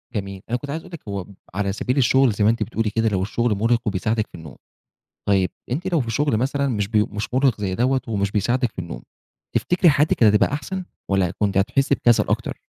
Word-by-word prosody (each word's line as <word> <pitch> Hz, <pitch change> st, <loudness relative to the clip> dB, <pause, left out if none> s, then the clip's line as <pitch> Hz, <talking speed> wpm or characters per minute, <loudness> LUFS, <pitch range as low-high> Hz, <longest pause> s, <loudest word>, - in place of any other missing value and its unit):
جميل. 100 Hz, -2 st, -4 dB
أنا 120 Hz, -, +1 dB
كُنت 140 Hz, +3 st, -9 dB
عايز 160 Hz, +3 st, -3 dB
أقول 180 Hz, -, -15 dB
لِك 170 Hz, -, -7 dB
هو 100 Hz, -2 st, -4 dB, 0.3 s
على 100 Hz, 0 st, -1 dB
سبيل 125 Hz, +6 st, -2 dB
الشغل 130 Hz, 0 st, +4 dB
زي 105 Hz, 0 st, -1 dB
ما 105 Hz, -, +5 dB
أنتِ 115 Hz, -1 st, +1 dB
بتقولي 115 Hz, -1 st, -1 dB
كده، 110 Hz, +2 st, +1 dB
لو 95 Hz, -3 st, 0 dB
الشغل 115 Hz, +3 st, 0 dB
مرهق 115 Hz, +4 st, +2 dB
وبِيساعدِك 105 Hz, +3 st, 0 dB
في -, -, -14 dB
النوم. 80 Hz, -5 st, -10 dB, 0.7 s
طيب 95 Hz, -2 st, +3 dB, 0.2 s
أنتِ 170 Hz, +9 st, -2 dB
لو 165 Hz, -, +3 dB
في 115 Hz, -2 st, -4 dB
شغل 145 Hz, -1 st, +1 dB
مثلًا 140 Hz, +3 st, 0 dB
مش 105 Hz, -6 st, -1 dB
ب 110 Hz, -, -7 dB, 0.2 s
مش 105 Hz, +3 st, -4 dB
مرهق 130 Hz, -5 st, +2 dB
زي 95 Hz, -2 st, -1 dB
دوّة 130 Hz, +4 st, +1 dB
ومش 100 Hz, -3 st, -1 dB
بيساعدِك 120 Hz, +4 st, +1 dB
في -, -, -9 dB
النوم، 85 Hz, -9 st, -6 dB, 0.5 s
تفتكري 180 Hz, 0 st, +3 dB
حياتِك 145 Hz, +1 st, +3 dB
كانت 105 Hz, -3 st, +5 dB
هتبقى 105 Hz, -, +3 dB
أحسن 185 Hz, +6 st, -4 dB, 0.3 s
والّا 95 Hz, -3 st, +2 dB
كُنتِ 100 Hz, -2 st, +1 dB
هتحسي 125 Hz, +7 st, +2 dB
بكسل 120 Hz, -2 st, +3 dB
أكتر؟ -, -, -2 dB
115 Hz, 220 wpm, -22 LUFS, 100-130 Hz, 0.7 s, ما